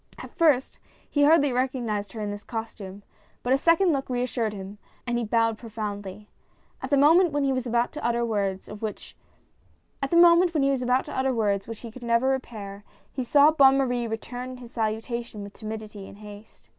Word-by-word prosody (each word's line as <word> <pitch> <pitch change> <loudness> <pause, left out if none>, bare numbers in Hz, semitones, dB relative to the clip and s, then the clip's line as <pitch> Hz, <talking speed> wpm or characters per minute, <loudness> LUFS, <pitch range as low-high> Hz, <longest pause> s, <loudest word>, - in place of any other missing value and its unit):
At - - -10
first 295 -6 +2 0.3
he 290 -1 +2
hardly 290 -2 +5
recog 255 0 -1
nized 210 -2 -3
her 220 - -6
in 205 -1 -3
this 205 0 -7
costume, 205 -4 -7 0.4
but 250 - +2
a - - +4
second 335 +3 +4
look 270 -2 -3
reassured 245 -3 -1
him, 200 0 -9 0.3
and 240 -1 -1
he - - -2
bowed 225 0 +1
profoundly. 210 -3 -6 0.5
At - - -5
the 285 - +3
moment 325 +5 +5
when 290 -1 +1
he 270 -1 +1
was 255 -1 -2
about 235 +1 +1
to 305 - -8
utter 235 0 +1
words 200 -4 -2
which 210 0 -6 1.0
he 265 - +2
could 255 - -12
never 235 +2 +2
repair, 210 -6 -4 0.3
he 260 - -3
saw 285 +4 +5
Bonne 270 -3 +5
Marie 245 -3 0
return 245 +3 -6
his 240 -2 -12
salutation 225 -1 -3
with 200 0 -10
timidity 215 -2 -8
and - - -13
haste. 210 0 -13
235 Hz, 165 wpm, -26 LUFS, 215-270 Hz, 1.0 s, hardly